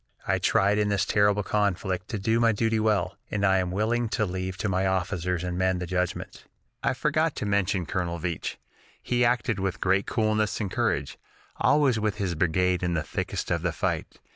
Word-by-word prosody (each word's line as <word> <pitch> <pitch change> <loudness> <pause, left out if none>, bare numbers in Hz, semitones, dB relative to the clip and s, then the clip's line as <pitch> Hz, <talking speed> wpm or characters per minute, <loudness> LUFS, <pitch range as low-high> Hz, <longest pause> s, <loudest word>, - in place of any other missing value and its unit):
"I - - +2
tried 100 +2 +3
in 105 -1 +1
this 100 -2 +1
terrible 105 0 +3
conflict 95 -2 -1
to 110 - -2
do 110 +4 +1
my 115 -1 +4
duty 110 +1 +1
well, 110 -1 +1
and 100 -1 0
I 95 -1 +4
am 90 -1 -1
willing 110 +5 0
to 110 - +2
leave 95 0 -4
to 110 - -2
my 95 0 +1
officers 90 -1 -1
and 90 0 -3
men 95 0 +2
the 90 - -3
judgment. 90 0 -3 0.4
"I - - 0
forgot 155 +3 +1
to - - -3
mention 100 -2 +1
Colonel 85 +1 -2
Veatch. 85 -1 -3 0.5
He 120 0 +1
acted 120 -3 +1
with 95 -2 -2
great 95 +1 +1
coolness 110 -1 0
and 100 -4 -3
courage, - - -1 0.4
always 140 -6 +3
with 105 -2 0
his 95 -4 -1
brigade 90 +2 +1
in 90 -1 0
the 80 - 0
thickest - - -3
of - - +1
the - - 0
fight. - - -3
100 Hz, 195 wpm, -26 LUFS, 90-110 Hz, 0.5 s, my